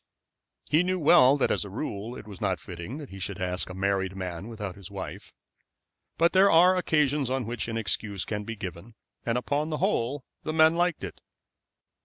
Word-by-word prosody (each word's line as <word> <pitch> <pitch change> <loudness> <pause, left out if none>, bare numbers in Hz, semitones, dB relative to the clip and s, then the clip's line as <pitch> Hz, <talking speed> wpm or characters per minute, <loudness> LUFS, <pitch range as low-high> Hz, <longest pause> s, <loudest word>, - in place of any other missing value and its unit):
He 155 - +5
knew 185 +1 0
well 150 -4 +6
that 140 - +1
as - - +1
a 100 - -8
rule 110 +1 -5
it - - -10
was 100 -4 -10
not - - 0
fitting 90 - -7
that 150 -3 -8
he 95 - -8
should 95 0 -5
ask 90 0 -2
a 90 - -7
married 95 -1 0
man 90 0 -5
without 105 -5 -5
his 100 -3 -11
wife; - - -7 0.9
but 170 +1 +3
there 195 +1 +6
are 180 +3 +6
occasions 150 -6 +1
on 130 -2 -1
which 120 +1 -3
an 115 -1 -3
excuse 105 -3 -1
can 105 -1 -3
be 115 +2 -5
given, 100 +3 -8 0.3
and 115 +1 +2
upon 145 +5 -1
the 155 - -2
whole 145 - 0 0.2
the 155 - -3
men 160 +1 +5
liked 175 - +1
it. 90 - -7
115 Hz, 200 wpm, -27 LUFS, 100-155 Hz, 0.9 s, well